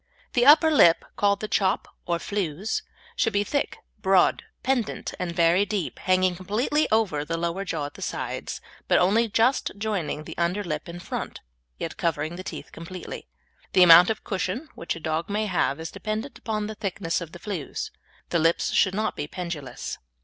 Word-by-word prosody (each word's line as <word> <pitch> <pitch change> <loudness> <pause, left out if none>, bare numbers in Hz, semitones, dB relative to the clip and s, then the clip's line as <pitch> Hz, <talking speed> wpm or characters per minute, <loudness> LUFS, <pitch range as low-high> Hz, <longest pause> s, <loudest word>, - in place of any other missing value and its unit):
The 245 +1 +3
upper 315 +2 +8
lip, 170 - +6
called 200 -1 +2
the 215 - -2
"chop," 195 -2 +1 0.2
or 170 -1 +1
flews, 195 +2 -2 0.3
should - - +1
be 205 0 +2
thick, 285 +6 -1 0.2
broad, 190 -2 +4 0.2
pendant 255 -4 -1
and 180 -1 -2
very 170 +2 +4
deep, 205 -4 -3
hanging 185 -1 +2
completely 220 - 0
over 205 -10 +2
the 165 +2 -3
lower 170 +3 -2
jaw 165 -6 -2
at 145 - -7
the - - -12
sides, - - -4 0.3
but - - +4
only 215 +6 +4
just 230 +5 +2
joining 200 -8 -2
the - - -8
under 175 +4 +1
lip 155 -1 -4
in 175 +1 -7
front, - - -5 0.4
yet - - -5
covering 160 0 -1
the 185 - -7
teeth - - -7
completely. 170 - -8 0.5
The 185 - +7
amount 175 +1 +9
of 220 - -2
"cushion" 200 - -3
which 170 - -4
a - - -7
dog 160 +2 -2
may 210 +2 0
have 175 -7 0
is 160 - -5
dependent 220 +5 -4
upon 215 -2 -2
the 215 - -4
thickness 190 -5 -2
of 165 -2 -7
the - - -9
flews. 180 -6 -5 0.4
The 170 - +2
lips 165 +1 +2
should 190 -1 +3
not 215 +1 -1
be 145 - -4
pendulous. 155 -8 -5
185 Hz, 185 wpm, -25 LUFS, 170-215 Hz, 0.5 s, amount